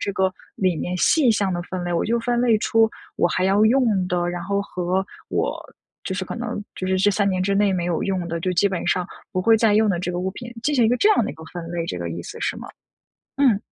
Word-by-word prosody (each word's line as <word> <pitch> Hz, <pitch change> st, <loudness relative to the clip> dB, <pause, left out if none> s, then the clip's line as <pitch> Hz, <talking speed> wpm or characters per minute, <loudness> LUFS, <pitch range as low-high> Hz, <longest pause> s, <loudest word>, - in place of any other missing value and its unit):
这 200 Hz, -, -2 dB
个 190 Hz, -1 st, +1 dB, 0.2 s
里 185 Hz, -3 st, +1 dB
面 180 Hz, +3 st, -3 dB
细 270 Hz, -, +4 dB
项 200 Hz, -3 st, +1 dB
的 175 Hz, 0 st, -2 dB
分 180 Hz, +1 st, -5 dB
类， 175 Hz, -, -2 dB
我 170 Hz, -, +1 dB
就 235 Hz, +2 st, +1 dB
分 240 Hz, 0 st, 0 dB
类 235 Hz, -3 st, +3 dB
出 225 Hz, +1 st, +3 dB, 0.3 s
我 -, -, +3 dB
还 185 Hz, +3 st, 0 dB
要 200 Hz, +3 st, +4 dB
用 220 Hz, -6 st, +3 dB
的， 175 Hz, -1 st, 0 dB
然 175 Hz, 0 st, -4 dB
后 200 Hz, 0 st, 0 dB
和 185 Hz, 0 st, -1 dB, 0.2 s
我 -, -, -1 dB, 0.5 s
就 190 Hz, -, -3 dB
是 190 Hz, 0 st, -3 dB
可 -, -, -6 dB
能 240 Hz, -3 st, -4 dB
就 185 Hz, -, -4 dB
是 190 Hz, 0 st, +1 dB
这 200 Hz, +2 st, +4 dB
3 200 Hz, 0 st, +1 dB
年 185 Hz, -1 st, 0 dB
之 200 Hz, +1 st, +1 dB
内 200 Hz, 0 st, +3 dB
没 180 Hz, -2 st, -1 dB
有 175 Hz, -2 st, -1 dB
用 185 Hz, -3 st, -2 dB
的， 170 Hz, -, -2 dB
就 185 Hz, +2 st, -1 dB
基 190 Hz, +3 st, +3 dB
本 185 Hz, -3 st, -3 dB
上 180 Hz, +1 st, +1 dB, 0.3 s
不 185 Hz, -, 0 dB
会 225 Hz, +4 st, +5 dB
再 220 Hz, -1 st, +3 dB
用 215 Hz, +1 st, +4 dB
的 185 Hz, -4 st, +1 dB
这 180 Hz, -, -2 dB
个 175 Hz, -, -2 dB
物 190 Hz, +1 st, -1 dB
品。 240 Hz, +3 st, -8 dB
进 295 Hz, +3 st, +1 dB
行 245 Hz, -4 st, +4 dB
一 -, -, +4 dB
个 245 Hz, -, +2 dB
这 410 Hz, -, +4 dB
样 400 Hz, -, +3 dB
的 -, -, -3 dB
一 -, -, -9 dB
个 160 Hz, +1 st, -12 dB
分 170 Hz, 0 st, -7 dB
类， 170 Hz, -1 st, -3 dB
这 90 Hz, -, -4 dB
个 85 Hz, -1 st, -4 dB
意 85 Hz, +1 st, -5 dB
思 -, -, -9 dB
是 -, -, -1 dB
吗？ -, -, -9 dB, 0.7 s
嗯。 255 Hz, -8 st, +4 dB
190 Hz, 295 characters per minute, -22 LUFS, 180-220 Hz, 0.7 s, 会